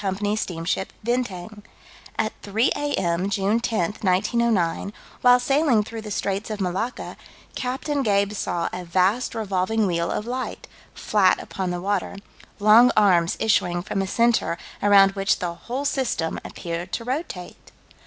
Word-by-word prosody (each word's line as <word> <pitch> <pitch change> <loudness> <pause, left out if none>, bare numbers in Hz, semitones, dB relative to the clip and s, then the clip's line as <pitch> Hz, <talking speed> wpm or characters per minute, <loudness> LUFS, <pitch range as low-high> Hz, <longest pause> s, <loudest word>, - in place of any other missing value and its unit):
's 205 +2 -1
steamship 175 +2 -3
Bintang. 215 -4 -3 0.6
At 220 0 0
3 220 +5 +1
A.M., 190 -10 -1
June 200 +3 +1
10, 215 -4 -1
1909, 200 -1 +1 0.3
while 245 0 +6
sailing 270 -3 +2
through 225 +1 -7
the 215 - -8
Straits 200 +1 -2
of 215 -1 -4
Malacca, 195 +6 -3 0.4
Captain 270 +3 -2
Gabe 200 -4 +2
saw 175 -4 -2
a 180 - -5
vast 185 +8 +1
revolving 215 0 0
wheel 170 -2 0
of 210 - -2
light, 255 +2 -5 0.3
flat 195 -4 +2
upon 190 -2 -4
the 175 0 -2
water 200 +1 -2 0.4
"long 220 +4 +7
arms 180 -5 +4
issuing 175 -5 +1
from 195 0 -2
a 195 - -2
center 230 -5 +2 0.2
around 200 -1 +6
which 195 +1 +1
the 175 -1 -3
whole 250 +10 -5
system 245 -13 -1
appeared 170 +2 -6
to 230 - -2
rotate." 250 - -5
205 Hz, 145 wpm, -23 LUFS, 185-230 Hz, 0.6 s, long